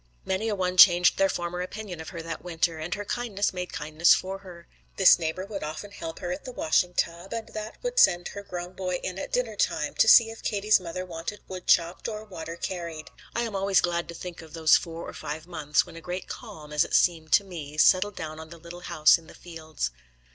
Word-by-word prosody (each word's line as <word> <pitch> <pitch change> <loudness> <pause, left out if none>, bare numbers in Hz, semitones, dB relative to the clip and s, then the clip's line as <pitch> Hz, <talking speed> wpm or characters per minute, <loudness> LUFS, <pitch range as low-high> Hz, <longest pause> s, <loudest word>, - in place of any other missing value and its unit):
Many 190 +4 -1
a 210 - 0
one 185 -1 -1
changed 180 -2 +7
their 195 0 +4
former 175 0 -3
opinion 185 -2 -6
of 160 - -8
her 170 -3 -7
that 165 0 -6
winter, 165 -2 -1
and 160 +2 -5
her 205 - -6
kindness 205 -4 -1
made 180 -1 -5
kindness 155 +2 +3
for 190 +1 -4
her. 175 -3 -13 0.3
This 190 -2 +7
neighbour 165 +3 -3
would 200 -1 -6
often 155 +7 -6
help 165 -5 -7
her 175 -2 -4
at 185 - -5
the 255 - -7
washing 245 - +1
tub, 170 +3 -2
and 225 -1 -5
that 215 0 -7
would - - 0
send 175 - +4
her 200 - -7
grown 180 -2 -7
boy 185 -1 -3
in 185 +1 -4
at - - -6
dinner - - -1
time - - 0
to - - +3
see 225 -2 +8
if 225 - -11
Katie's 210 0 +2
mother 180 +1 -5
wanted 170 +4 -6
wood 185 -1 -8
chopped 170 +1 +2
or 215 -1 -5
water 165 -5 -7
carried. 170 -3 -5 0.2
I 235 - +1
am 225 -3 -4
always 195 -1 +3
glad 170 -1 -1
to 170 - -8
think 180 0 -8
of 160 -1 -14
those 160 -1 +5
four 165 -1 -3
or - - -8
five 155 +1 -6
months, 155 -4 0
when 170 - -13
a 165 - -9
great 180 +3 -5
calm, 160 -11 -9
as 150 - +4
it - - -2
seems 165 -3 +2
to 200 - -8
me, 155 -6 -8
settled 190 +5 +4
down 155 -1 -6
on 160 0 -10
the 170 - -11
little 170 +1 -10
house 170 -3 +4
in 165 - -18
the - - -14
fields. 160 - -5
180 Hz, 235 wpm, -27 LUFS, 165-195 Hz, 0.3 s, see